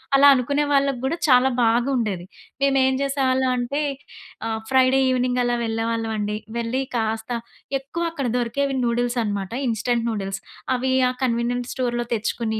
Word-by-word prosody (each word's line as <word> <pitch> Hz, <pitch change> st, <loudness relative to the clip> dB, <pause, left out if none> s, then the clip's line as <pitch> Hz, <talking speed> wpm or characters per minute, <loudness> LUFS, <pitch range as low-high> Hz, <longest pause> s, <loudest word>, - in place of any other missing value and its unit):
అలా 280 Hz, +1 st, +7 dB
అనుకునే 280 Hz, +3 st, +1 dB
వాళ్ళగ్గూడా 275 Hz, +2 st, +1 dB
చాలా 255 Hz, 0 st, +6 dB
బాగుండేది. 230 Hz, -5 st, +1 dB, 0.4 s
మేం 275 Hz, 0 st, +3 dB
ఏం 265 Hz, -, +2 dB
చేసేవాళ్ళం 265 Hz, -2 st, +1 dB
అంటే 245 Hz, +4 st, -2 dB, 0.7 s
ఆ! -, -, -1 dB, 0.2 s
ఫ్రైడే 260 Hz, 0 st, +4 dB
ఈవెనింగ్ 250 Hz, 0 st, +1 dB
అలా 240 Hz, 0 st, +1 dB
వెళ్ళేవాళ్ళం 225 Hz, 0 st, -1 dB
అండి. 210 Hz, 0 st, -2 dB, 0.2 s
వెళ్లి 235 Hz, +3 st, -1 dB
కాస్త 220 Hz, 0 st, -2 dB, 0.5 s
ఎక్కువ 280 Hz, +6 st, -5 dB
అక్కడ 275 Hz, -6 st, -3 dB
దొరికేవి 270 Hz, +4 st, -1 dB
నూడిల్స్ 240 Hz, +1 st, 0 dB
అన్నమాట. 200 Hz, -3 st, -3 dB, 0.2 s
ఇన్‌స్టంట్ 235 Hz, +1 st, 0 dB
నూడిల్స్ 195 Hz, -2 st, -3 dB, 0.4 s
అవి 260 Hz, +1 st, -1 dB, 0.2 s
ఆహ్, 250 Hz, -, -2 dB
కన్వీనియంట్ 240 Hz, 0 st, 0 dB
స్టోర్‌లో 240 Hz, -2 st, -1 dB
తెచ్చుకొని 220 Hz, 0 st, -1 dB
245 Hz, 140 wpm, -23 LUFS, 225-265 Hz, 0.7 s, అలా